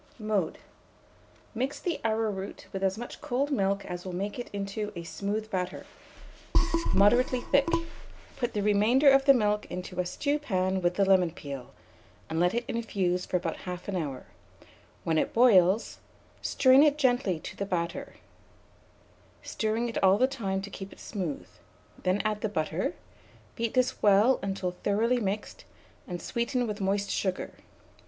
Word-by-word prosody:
Mode. 215 -7 -1 1.0
Mix 260 +5 -2
the 345 -3 -3
arrowroot 220 -3 -2
with 195 - -3
as 190 +1 +1
much 240 +1 -8
cold 275 +4 -1
milk 200 -5 0
as 180 0 -6
will 185 -2 -5
make 200 +5 -3
it 240 - -5
into 205 +1 -4
a 170 - -5
smooth 205 +5 -3
batter, 185 -1 -3 1.1
moderately 245 +5 +4
thick; 280 +4 +2 0.7
put 240 -2 -2
the 205 - -1
remainder 220 +7 +5
of 270 0 +4
the 275 - +8
milk 210 -3 +1
into 180 0 -6
a 180 - +1
stewpan 190 -10 0
with 175 0 +1
the 195 - +3
lemon 190 -3 +4
peel, 140 -6 -8 0.6
and 160 - 0
let 180 +4 +2
it 235 0 -1
infuse 190 -6 -1
for 180 - +1
about 165 -2 -3
1/2 180 +1 -5
hour; 145 -7 -3 0.8
when 160 -1 +2
it - - -1
boils, 210 -4 +4 0.4
strain 260 +1 +5
it 295 -1 +4
gently 245 - +2
to - - -8
the - - -3
batter, 175 -3 -3 1.3
stirring 220 +2 -1
it 230 - -3
all 190 +1 +6
the 255 - +4
time 200 -8 -2
to 200 - -7
keep 195 0 -8
it - - -14
smooth; 180 -9 -4 0.5
then 185 +2 +1
add 210 -1 0
the 220 - -1
butter; 160 -1 -2 0.6
beat 230 0 -2
this 255 0 +1
well 210 +5 +5
in - - -4
until 190 -2 -2
thoroughly 230 +5 +2
mixed, 205 -1 -3 0.4
and 175 -3 -5
sweeten 245 +1 -1
with 210 -2 -4
moist 200 +1 0
sugar. 185 -2 -2
200 Hz, 160 wpm, -28 LUFS, 185-235 Hz, 1.3 s, the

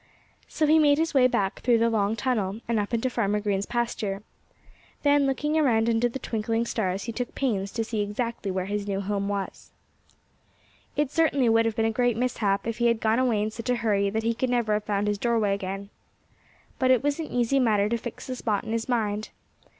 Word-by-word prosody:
So 310 - 0
he 310 +1 +5
made 290 -2 +5
his 325 +1 0
way 260 -2 +5
back 195 -5 -1
through 240 -1 +3
the 230 +1 +3
long 210 -1 +1
tunnel, 215 -2 -1
and 230 -2 +1
up 205 +2 -2
into 235 +2 0
Farmer 210 -4 0
Green's 205 -1 -1
pasture. 215 -4 -2 0.8
Then, 285 -1 +4
looking 295 +3 0
around 230 -6 +3
under 235 +1 +2
the 240 - -5
twinkling 225 -1 -1
stars, 195 -5 -2
he 235 - -4
took 245 +1 -5
pains 200 -8 -1
to 230 - -1
see 220 -1 -2
exactly 210 +1 -3
where 185 -1 -2
his 205 +1 -3
new 195 -1 -1
home 200 0 -2
was. 200 -1 -4 1.3
It 290 -2 0
certainly 285 -7 +2
would 225 0 +4
have 225 - -2
been 225 - +1
a 225 - +2
great 245 0 +1
mishap 215 -5 0
if 230 0 -3
he 235 - +3
had 230 -1 +2
gone 225 +2 +2
away 235 -5 +2
in 215 - -2
such 230 +2 -6
a 250 - +3
hurry 205 -4 +1
that 220 +2 -2
he 230 +1 +1
could 255 +2 -1
never 240 -3 +1
have 210 0 -1
found 205 0 0
his 205 -1 0
doorway 225 -4 +1
again. 195 +1 -5 0.9
But 260 -1 +2
it 255 0 +4
was 290 +2 0
an 320 - -3
easy 245 +3 +1
matter 210 -5 +3
to 235 - 0
fix 240 0 -7
the 255 - -4
spot 215 -4 -1
in - - -6
his 230 +2 -2
mind. 215 -3 -1
225 Hz, 220 wpm, -26 LUFS, 205-245 Hz, 1.3 s, he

